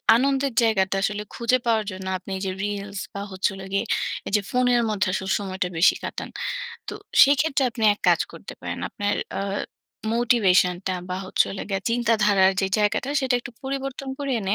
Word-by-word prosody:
আনন্দের 270 +1 +1
জায়গাটা 195 -4 +2
আসলে 210 0 -1
খুঁজে 235 +2 +2
পাওয়ার 225 -2 +2
জন্য 185 0 -7
আপনি 190 +1 -11
যে 190 - -1
রিলস 200 -1 -4
বা, 200 - -4
হচ্ছে 190 +2 0
হলো 195 0 -8
গিয়ে 195 +4 +1 0.4
এইযে 210 +1 +2
ফোনের 245 -1 +3
মধ্যে 210 -1 0
আসলে 190 0 -2
সময়টা 190 -2 -3
বেশি 165 - +6
কাটান। - - -5 0.6
তো - - -4 0.3
সেইক্ষেত্রে 280 0 +4
আপনি 230 -1 -7
এক - - -24
কাজ - - +4
করতে - - -9
পারেন। - - -5
আপনার 205 -1 -1 0.2
আ - - -1 0.7
মোটিভেশনটা 190 -6 +3 0.2
বা, 180 - -2
হচ্ছে - - +3
হলো 195 - -5
গিয়ে 195 -1 -1
চিন্তাধারার 210 -5 +3
যে 195 - +1
জায়গাটা, 210 +6 +1
সেটা 260 -2 +1
একটু 240 - -8
পরিবর্তন 270 0 -4
করে 280 -1 -3
এনে 195 0 0
210 Hz, 175 wpm, -24 LUFS, 195-245 Hz, 0.7 s, বেশি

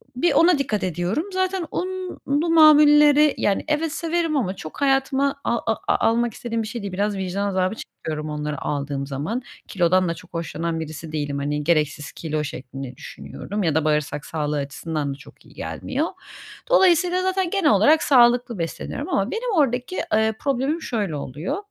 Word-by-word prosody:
bir 340 +7 +2
ona 335 0 +5
dikkat 215 -7 -1
ediyorum. 180 - -1
Zaten 375 -1 0
unlu 360 -4 -2
mamulleri, 300 -2 +7
yani, 200 -1 0
evet, 305 +1 0
severim 330 -1 -1
ama 195 -7 -1
çok 155 - -9
hayatıma 275 0 +1
a 235 - +1 0.2
a - - 0
almak 235 -1 0
istediğim 230 -2 -3
bir - - -5
şey 225 +1 -5
değil, 195 -2 -5
biraz 205 +1 -1
vicdan 190 +2 -2
azabı 185 +2 0
çekiyorum 155 -7 -6
onları 150 -1 -4
aldığım 140 -1 -3
zaman. 150 - -3 0.3
Kilodan 185 -1 +2
da - - 0
çok 175 +1 -15
hoşlanan 165 0 -3
birisi 155 0 -7
değilim, 145 -2 -2
hani, 150 +1 -2
gereksiz 150 -2 0
kilo 155 -2 -3
şeklinde 135 -2 -7
düşünüyorum 205 +1 -6
ya 160 -4 +1
da 160 -1 +1
bağırsak 150 -1 0
sağlığı 150 -2 -2
açısından 145 +1 -3
da - - -11
çok 140 - -17
iyi - - -18
gelmiyor. 280 +5 -3 0.6
Dolayısıyla 365 -4 +4
zaten 375 -1 0
genel 355 -6 +2
olarak 230 +11 +5
sağlıklı 240 -5 +4
besleniyorum 165 - -4
ama - - 0
benim 465 0 -2
oradaki, 265 +2 +1 0.2
ııı, 220 0 +3
problemim 280 +4 -1
şöyle 205 - -2
oluyor: 145 - -4
210 Hz, 165 wpm, -23 LUFS, -, 0.6 s, mamulleri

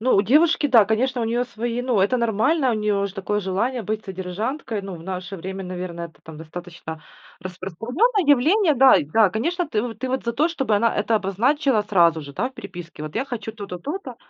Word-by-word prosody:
Ну 255 +3 +3
у 195 - +4
девушки, 300 - +4
да, 240 -6 +6
конечно, 245 +4 0
у - - 0
неё 235 +2 0
свои 240 0 -3
ну, 245 -5 +1
это 200 +6 +2
нормально. 245 +5 +2
У - - +1
нее 210 -2 0
же 195 - -9
такое 210 +1 -1
желание 215 +6 -1
быть 215 +1 -3
содержанкой. 205 - -4
Ну, 195 -1 -6
в 165 - -12
наше 185 +1 -5
время, 190 +2 -6
наверно, 180 -1 -5
это 170 -1 -9
там 160 -1 -11
достаточно 160 -1 -8 0.4
распространенное 225 - -1
явление. 310 - +4
Да, 265 0 +7
и - - +1
да, 205 +8 +4
конечно, 335 - -1
ты 215 -7 0
вот 230 -3 -5
ты 260 - -3
вот 260 +1 -2
за 235 - -1
то, 300 +7 +2
чтобы 270 -10 0
она 230 +2 +2
это 215 +2 +1
обозначила 225 +5 +1
сразу 170 -6 +3
же, 140 -1 -10
да, 215 - -1
в 265 - -22
переписке. 175 -7 -9
Вот 155 -1 -7
я 230 - 0
хочу 225 -4 -5
то-то, 200 -5 -7
то-то, 330 - -6
220 Hz, 220 wpm, -23 LUFS, 185-255 Hz, 0.4 s, Да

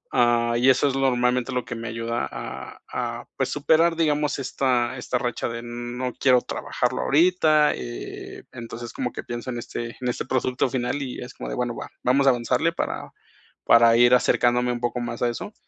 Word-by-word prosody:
ah, 120 -1 +3
y 125 +2 +4
eso 130 +2 +4
es 135 - 0
lo 135 - 0
normalmente 125 0 +1
lo 125 - -1
que 120 - -5
me 115 0 -6
ayuda 115 -8 -2
a 65 - -7
a, - - -3
pues, - - 0
superar, 160 +3 +3
digamos, 150 -3 +1
esta 130 -2 0
esta 125 0 -2
racha 120 -1 -2
de: 115 0 -5
"No 120 +1 -5
quiero 125 -2 +4
trabajarlo - - -2
ahorita". 155 -1 +4
Eh, - - -8
entonces, 120 0 -7
como 125 -2 -3
que - - -6
pienso 120 +1 -6
en 120 - -4
este 120 0 -6
en 125 - -1
este 120 - -3
producto 130 0 0
final 130 +2 -2
y 130 -2 -5
es 125 - -8
como - - -7
de: - - -3
"Bueno, 125 -1 -1
va. - - -7
Vamos 135 +2 +3
a 135 - +8
avanzarle 125 +7 0
para - - -4 0.5
para 115 0 +6
ir 120 +1 +6
acercándome 125 0 +2
un 120 - -5
poco 120 +1 -1
más 120 -1 -5
a 120 - +2
eso". 160 - -6
125 Hz, 200 wpm, -24 LUFS, 120-130 Hz, 0.5 s, a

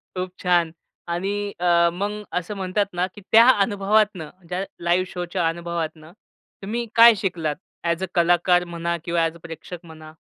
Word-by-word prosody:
खूप 185 0 -3
छान! 175 -3 +2 0.4
आणि 200 +4 -2
अ, 170 -1 +4
मग 205 +3 -4
असं 180 +4 -4
म्हणतात 195 +1 -1
ना, 175 +1 0
की 205 - -11
त्या 230 +2 +8
अनुभवातून 205 -2 +2 0.3
त्या 180 +2 -2 0.2
लाईव्ह 175 +2 +2
शोच्या 175 -2 -2
अनुभवातून, 165 -2 -4 0.6
तुम्ही 235 +4 -3
काय 230 0 +9
शिकलात, 165 -6 -2 0.3
ॲज 170 +2 -1
अ - - +1
कलाकार 175 +1 +3
म्हणा 170 0 -3
किंवा 170 0 0
ॲज 165 0 -3
अ - - -14
प्रेक्षक 170 +1 -9
म्हणा? 155 -1 -12
175 Hz, 160 wpm, -23 LUFS, 170-200 Hz, 0.6 s, काय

